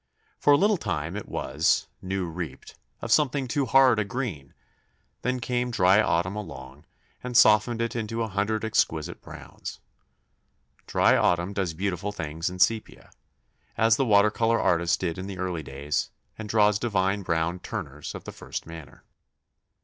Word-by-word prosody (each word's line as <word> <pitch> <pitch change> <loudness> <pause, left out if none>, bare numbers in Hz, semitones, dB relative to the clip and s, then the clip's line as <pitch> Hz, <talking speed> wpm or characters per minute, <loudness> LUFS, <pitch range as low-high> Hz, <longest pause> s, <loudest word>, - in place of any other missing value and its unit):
For 145 - +4
a 145 - +7
little 205 +5 +3
time 80 - -3
it 105 - -6
was 75 +5 +1 0.2
new 95 0 -2
reaped 85 -4 -7 0.3
of 115 - -3
something 140 -1 +2
too 140 +1 -1
hard 130 -2 +5
a - - +2
green; 100 - -5 0.7
then 125 +1 -1
came 125 0 -1
dry 95 -2 +4
autumn 90 0 0
along, 70 -7 -9 0.4
and 125 -1 0
softened 115 +1 +5
it 115 0 -3
into 115 0 -2
a - - -2
hundred 110 +2 -1
exquisite 80 -8 0
browns. - - -9 1.1
Dry - - +4
autumn 90 +3 +1
does 95 -5 -2
beautiful 100 +2 -2
things 80 -2 -4
in 90 - -8
sepia, 110 +4 0 0.7
as 115 0 +4
the 135 - +1
water 105 -2 +5
colour 115 +1 +1
artist 85 -1 +2
did 85 -1 -3
in 95 - -5
the 95 -2 -6
early 90 -3 -3
days, 70 +1 -3 0.3
and 110 -1 -8
draws 105 -1 +3
divine 100 -3 0
brown 85 0 -1
Turners 75 -3 -6
of - - -8
the - - -7
first - - -7
manner. 80 -2 -11
100 Hz, 160 wpm, -26 LUFS, 85-115 Hz, 1.1 s, a